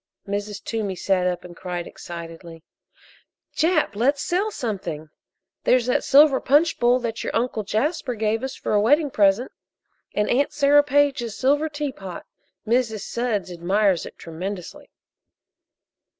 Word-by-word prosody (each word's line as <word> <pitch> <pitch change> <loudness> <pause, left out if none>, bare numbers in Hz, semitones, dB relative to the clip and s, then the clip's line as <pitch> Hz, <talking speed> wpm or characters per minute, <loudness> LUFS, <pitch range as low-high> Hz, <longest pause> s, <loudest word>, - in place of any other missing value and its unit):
Mrs. 205 +1 -4
Toomey 210 -4 -3
sat 185 0 +1
up 180 -1 -2
and 175 -1 -11
cried 175 -1 -5
excitedly: 165 -1 -9 0.9
"Jap, 320 - +2
let's 275 +6 +1
sell 380 +7 0
something! 190 - -5 0.5
There's 250 -2 +3
that 250 - +1
silver 280 -1 +6
punch 300 +5 +3
bowl 240 +1 +4
that 230 -1 -3
your - - -3
Uncle 230 -1 0
Jasper 250 - -1
gave 220 +1 0
us 265 - -4
for - - -3
a 205 - +4
wedding 290 +6 +3
present, 205 +3 +2 0.6
and 210 - +1
Aunt 280 +4 +1
Sarah 290 0 +5
Page's 280 -6 +1
silver 290 +4 +2
teapot 270 - -6 0.4
Mrs. 225 -2 +1
Sudds 225 -6 -2
admires 185 +1 +1
it - - -13
tremendously." 180 +3 -7
225 Hz, 135 wpm, -23 LUFS, 195-280 Hz, 0.9 s, silver